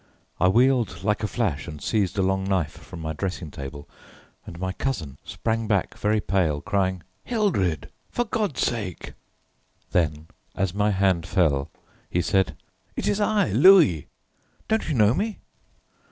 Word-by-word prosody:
I 90 - +4
wheeled 120 -1 +2
like 105 +1 +1
a 105 - 0
flash 95 - -1
and 75 -2 -7
seized 100 +3 0
a 95 - +2
long 95 0 +1
knife 95 -6 0
from 90 -1 -11
my 80 0 -3
dressing 90 -2 -4
table, 70 +1 -8 0.6
and 85 - -8
my 95 0 -2
cousin 90 - -3
sprang 115 -1 -2
back 100 -4 0
very 105 +1 +1
pale, 90 -8 +1
crying: 95 -1 -1 0.2
"Hildred! 95 - 0 0.2
for 240 - -1
God's 210 - -1
sake!" 105 -7 -2 0.8
then 80 -3 0 0.3
as 95 -2 0
my 105 +1 +2
hand 95 -4 +1
fell, 70 -7 +1 0.4
he 90 - 0
said: 95 +3 +1 0.4
"It - - -2
is 205 +1 +1
I, 205 - +2
Louis, 135 - +6 0.6
don't 220 0 0
you 155 - 0
know 105 -1 +5
me?" 210 - -2
95 Hz, 155 wpm, -25 LUFS, 85-115 Hz, 0.8 s, Louis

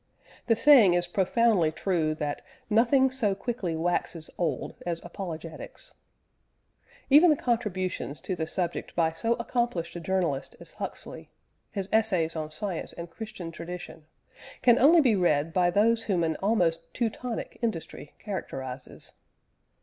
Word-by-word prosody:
The 230 - +4
saying 230 -8 +7
is 175 0 +1
profoundly 190 -1 +2
true 160 -2 0
that 150 -1 -3 0.3
"nothing 255 +4 +4
so 220 -7 0
quickly 200 -5 -3
waxes 165 -1 -2
old 160 -7 -2
as 170 -1 -2
apologetics." 165 -3 -7 1.2
Even 310 +5 +8
the 305 - +5
contributions 190 - -2
to 185 - -3
the 160 -2 -3
subject 175 0 -3
by 165 -2 +2
so 225 +8 0
accomplished 235 -8 -2
a - - -4
journalist 170 -6 -1
as - - -7
Huxley - - -7 0.4
his 195 -2 -3
Essays 185 -7 +2
on 155 -1 -3
Science 170 +3 -4
and 170 0 -8
Christian 185 -4 -7
Tradition 170 -2 -8 0.6
can 240 -1 +6
only 320 +5 +7
be 245 -7 +3
read 165 -4 +1
by 180 -1 +3
those 225 +5 +3
whom 180 -5 +1
an 160 -1 0
almost 175 -6 0
Teutonic 235 0 -3
industry 190 -9 -4
characterises. 135 - -6
180 Hz, 135 wpm, -27 LUFS, 165-225 Hz, 1.2 s, Even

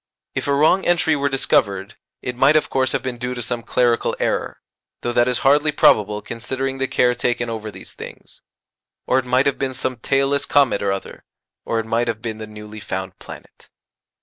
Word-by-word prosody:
If - - -3
a 140 - +2
wrong 155 +7 +4
entry 165 -2 +3
were 140 -1 0
discovered, 100 -6 +1 0.3
it 125 - -3
might 135 +4 +4
of 155 - +2
course 130 -1 +1
have - - -1
been 125 -2 -4
due 125 0 -3
to 120 - -4
some 120 +1 -3
clerical 120 0 +1
error, - - -1 0.4
though 120 - -1
that 120 0 +3
is 125 -1 +1
hardly 145 +2 +4
probable 105 -7 +3
considering 130 +3 -4
the 135 - 0
care 125 -1 +3
taken 120 -1 -1
over 110 -1 -5
these 105 - -11
things, - - -11 0.6
or 130 - +3
it 130 - -5
might 125 +2 +2
have 140 - 0
been 130 -1 -2
some 130 0 -2
tailless 135 +3 +1
comet 140 -7 +3
or 100 - +1
other, 95 0 -6 0.4
or 115 - 0
it 110 - -3
might 115 +2 0
have 115 -2 -2
been 110 -1 -5
the 110 - -6
newly 105 0 -10
found 95 -1 -5
planet. - - -13
125 Hz, 200 wpm, -21 LUFS, 110-135 Hz, 0.6 s, wrong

